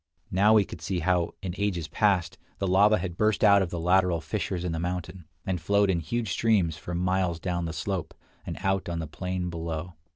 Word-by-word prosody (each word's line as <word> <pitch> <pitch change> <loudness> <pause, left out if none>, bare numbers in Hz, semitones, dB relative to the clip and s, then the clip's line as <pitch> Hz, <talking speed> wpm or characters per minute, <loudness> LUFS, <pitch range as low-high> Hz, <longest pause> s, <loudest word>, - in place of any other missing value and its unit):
Now 105 +4 +5
we 105 -2 +5
could 80 - -10
see 90 +1 -2
how, 90 0 +1
in 90 -2 -3
ages 90 -6 -1
past, 90 -3 +1 0.2
the 100 - -2
lava 100 +3 +5
had 90 -4 -5
burst 110 0 +2
out 100 -2 +7
of 95 - -1
the 85 - -4
lateral 90 0 +3
fissures 85 +3 -3
in 90 - -2
the 80 - -2
mountain, 90 0 -4 0.2
and 90 -3 -2
flowed 100 +3 +3
in 85 - 0
huge 110 +5 -2
streams 100 -9 +2
for 75 +3 -6
miles 90 -1 0
down 85 -1 -2
the 80 - -3
slope, 90 +2 -4 0.3
and - - -6
out 95 -2 0
on 85 - -2
the 80 - -3
plain 90 +3 -4
below. 85 +1 -4
90 Hz, 215 wpm, -27 LUFS, 85-95 Hz, 0.3 s, out